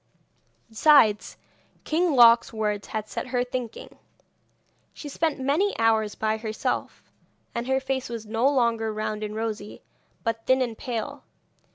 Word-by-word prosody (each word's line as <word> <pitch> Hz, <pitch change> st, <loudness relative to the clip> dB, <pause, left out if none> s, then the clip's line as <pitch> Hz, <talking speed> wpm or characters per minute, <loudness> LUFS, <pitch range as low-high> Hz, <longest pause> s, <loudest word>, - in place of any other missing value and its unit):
Besides, 225 Hz, -2 st, +4 dB, 0.5 s
King 330 Hz, +1 st, +1 dB
Loc's 235 Hz, -2 st, +6 dB
words 210 Hz, -2 st, -2 dB
had 215 Hz, -1 st, -4 dB
set -, -, -5 dB
her 245 Hz, -1 st, 0 dB
thinking; 245 Hz, -2 st, -6 dB, 1.0 s
she 300 Hz, -, -8 dB
spent 300 Hz, 0 st, -1 dB
many 295 Hz, +10 st, +1 dB
hours 220 Hz, -2 st, +2 dB
by 220 Hz, 0 st, -1 dB
herself, 220 Hz, -1 st, -3 dB, 0.5 s
and 235 Hz, +1 st, -3 dB
her 265 Hz, 0 st, +2 dB
face 265 Hz, -1 st, -3 dB
was 230 Hz, -2 st, -6 dB
no 225 Hz, +5 st, +1 dB
longer 235 Hz, -5 st, +1 dB
round 215 Hz, 0 st, -3 dB
and 210 Hz, 0 st, -4 dB
rosy, 215 Hz, -2 st, -5 dB, 0.4 s
but 230 Hz, -1 st, -3 dB
thin 260 Hz, 0 st, +4 dB
and 235 Hz, -3 st, -4 dB
pale. 230 Hz, -2 st, -5 dB
230 Hz, 140 wpm, -25 LUFS, 220-260 Hz, 1.0 s, Loc's